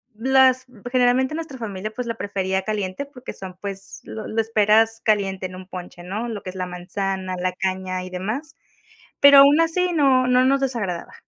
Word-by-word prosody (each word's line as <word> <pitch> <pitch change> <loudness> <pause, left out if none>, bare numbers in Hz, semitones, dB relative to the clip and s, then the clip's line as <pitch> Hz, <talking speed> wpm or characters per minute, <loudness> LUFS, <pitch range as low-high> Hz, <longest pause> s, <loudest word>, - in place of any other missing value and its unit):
las 260 +2 +4 0.2
generalmente, 255 +3 +2
nuestra 320 -4 -6
familia, 215 -3 -5
pues, 250 +1 -5
la 230 - -3
prefería 190 -3 -2
caliente 205 +3 -3
porque 260 -2 -10
son, 185 -1 -9
pues, 195 -1 -5
lo 220 - -7
lo 225 - -2
esperas 225 +1 +3
caliente 195 -3 0
en 185 - -11
un 185 0 -10
ponche, 180 -2 -9
¿no?, 210 +7 -4
lo 210 -4 -6
que - - -6
es - - -17
la 185 -1 -3
manzana, 185 +1 -4
la 180 +1 -1
caña 185 -1 -3
y - - -8
demás. 220 - -5 0.7
Pero 280 0 +9
aún 285 +3 +7
así 355 +2 +1
no 265 -5 +3
no 250 0 +4
nos 275 +1 +3
desagradaba. 225 -10 -3
215 Hz, 185 wpm, -22 LUFS, 190-260 Hz, 0.7 s, Pero